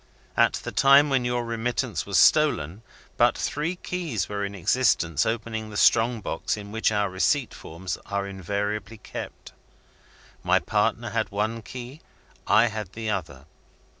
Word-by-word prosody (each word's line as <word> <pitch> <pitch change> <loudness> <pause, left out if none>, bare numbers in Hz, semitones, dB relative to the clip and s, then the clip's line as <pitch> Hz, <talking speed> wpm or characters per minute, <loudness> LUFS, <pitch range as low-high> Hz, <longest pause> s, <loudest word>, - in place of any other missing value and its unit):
At - - +4
the - - -5
time 140 +1 +5
when 130 -2 +2
your 120 0 -1
remittance 115 0 -2
was 100 - +1
stolen, 105 - +3 0.4
but - - +4
three 155 +5 -2
keys 175 - -3
were 100 0 -3
in 100 0 -4
existence 90 - +2
opening 110 -1 -3
the 105 - -6
strong 115 +1 +4
box 90 - -2
in 100 -1 -9
which 110 0 +1
our 105 -1 +1
receipt 110 +8 0
forms 90 +3 -6
are 100 0 -2
invariably 100 +3 -4
kept. - - -8 0.9
My - - +3
partner - - 0
had - - -1
one 110 +3 -2
key; 125 +6 -9 0.5
I 115 - +5
had 110 -4 -4
the 110 -1 -3
other. 70 -9 -5
110 Hz, 150 wpm, -25 LUFS, 100-120 Hz, 0.9 s, time